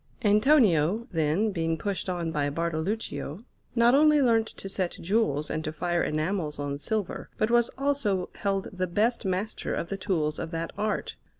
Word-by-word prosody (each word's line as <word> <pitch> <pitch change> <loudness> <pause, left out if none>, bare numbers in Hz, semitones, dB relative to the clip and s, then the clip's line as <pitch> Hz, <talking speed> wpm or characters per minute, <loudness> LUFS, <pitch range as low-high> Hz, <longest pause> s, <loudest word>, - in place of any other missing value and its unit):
Antonio, 210 - +4
then, 165 +6 +1
being 165 -3 -1
pushed 195 +2 -3
on 170 -2 -2
by 145 -2 0
Bartoluccio, 165 +1 -3 0.3
not 235 +1 +5
only 300 +1 +6
learnt 230 -4 +3
to 195 - -8
set 190 -2 -2
jewels 165 -7 +1
and 155 - -2
to 155 - -3
fire 175 +2 -1
enamels 155 0 -1
on 140 0 -3
silver, 210 +4 -3
but 215 - +1
was 240 -1 +4
also 270 -10 0
held 195 -1 -1
the 185 -1 -1
best 220 +6 +1
master 190 +3 -2
of 170 - -3
the 195 - -3
tools 170 -6 -1
of 165 - -4
that 165 0 -4
art. 215 0 -2
185 Hz, 170 wpm, -27 LUFS, 160-220 Hz, 0.3 s, only